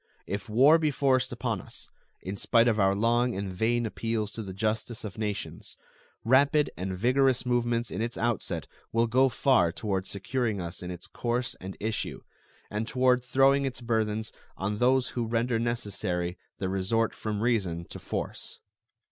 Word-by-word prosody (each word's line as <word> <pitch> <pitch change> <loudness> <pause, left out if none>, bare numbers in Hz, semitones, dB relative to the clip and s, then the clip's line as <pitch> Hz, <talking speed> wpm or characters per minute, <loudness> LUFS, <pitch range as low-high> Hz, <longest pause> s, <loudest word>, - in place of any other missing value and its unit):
If 100 +3 -4
war 135 +9 +6
be 155 -1 +2
forced 135 -3 +2
upon - - -2
us, - - -10 0.4
in 95 +2 -4
spite 115 +3 +3
of 110 -2 +2
our 95 0 +4
long 120 +3 +2
and 95 -1 -3
vain 115 +5 +1
appeals 110 -1 -2
to 115 - -6
the 100 -3 -6
justice 110 +3 -2
of 105 0 -7
nations, 105 -2 -4 0.5
rapid 140 +4 +4
and 95 0 -4
vigorous 130 +3 +3
movements 120 -1 0
in - - -3
its 115 +1 -2
outset 120 -3 -1 0.3
will 115 +1 +3
go 130 +3 +4
far 110 -7 +3
toward 95 0 -2
securing 110 +1 -2
us 85 -1 -6
in 90 - -6
its 90 -1 -7
course 120 +1 -2
and 95 +1 -7
issue, 110 0 -3 0.5
and 105 +2 -2
toward 125 -1 +3
throwing 135 +2 +4
its 130 -2 -3
burthens 110 -2 -1 0.3
on 100 +2 -2
those 130 +1 +3
who 120 -2 -2
render 115 +1 +1
necessary 100 -7 -2 0.2
the 95 - -2
resort 95 +4 0
from 105 -1 -3
reason 95 -8 0
to - - -9
force. - - -5
115 Hz, 165 wpm, -28 LUFS, 100-125 Hz, 0.5 s, war